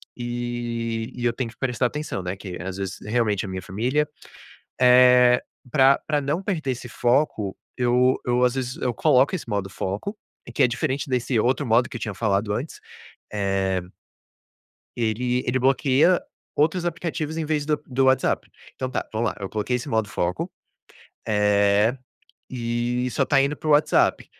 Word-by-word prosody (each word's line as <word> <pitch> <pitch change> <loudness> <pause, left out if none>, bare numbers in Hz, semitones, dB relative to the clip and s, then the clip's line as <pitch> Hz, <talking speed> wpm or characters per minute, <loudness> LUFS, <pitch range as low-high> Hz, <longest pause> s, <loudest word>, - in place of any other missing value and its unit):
e 120 -2 -3
e 120 - -4
eu 120 - +2
tenho 120 -1 -3
que 115 - -16
prestar 125 -1 0
atenção, 150 -8 -4
né, 90 +2 -3
que 95 -2 -7
às 95 +1 -5
vezes, 95 -2 -5
realmente 105 -3 +1
é - - -6
a - - -6
minha 95 0 -4
família. 125 +12 -1 0.7
Eh, 125 0 +6 0.3
pra 135 +1 +5
pra 150 -1 +1
não 145 +6 -1
perder 165 -9 -2
esse 125 0 -6
foco, 120 -5 +1 0.2
eu 125 +1 +3
eu, 125 0 +2
às 125 - +2
vezes, 130 -1 -3
eu 125 - -1
coloco 130 +8 +3
esse 170 - -6
modo 100 -2 -2
foco 100 - -4 0.4
que - - +3
é - - +6
diferente 135 +3 -2
desse 125 -1 0
outro 130 +6 +1
modo 120 +2 +3
que 140 - -10
eu - - -12
tinha 105 - -3
falado 105 0 0
antes, 130 +9 -5 0.5
eh 95 -2 0 1.2
Ele 120 +2 0
ele 125 +1 +1
bloqueia 135 +6 +3 0.4
outros 160 +4 +2
aplicativos 160 -2 -3
em 165 - -2
vez 150 -1 -1
do 150 -1 +1
do 130 0 +1
WhatsApp. 130 0 +2 0.3
Então 130 - -3
tá, - - -3
vamos 115 +2 0
lá, - - -9
eu 100 -2 -5
coloquei 110 +5 -1
esse 125 +4 -6
modo 110 -3 0
foco, 90 -1 -2 0.8
eh, 105 +2 +3 0.5
e 120 0 -2
só - - +1
tá 140 -2 +4
indo 140 +2 0
pro 155 - -3
WhatsApp. 150 +1 +3
125 Hz, 170 wpm, -24 LUFS, 110-135 Hz, 1.2 s, Eh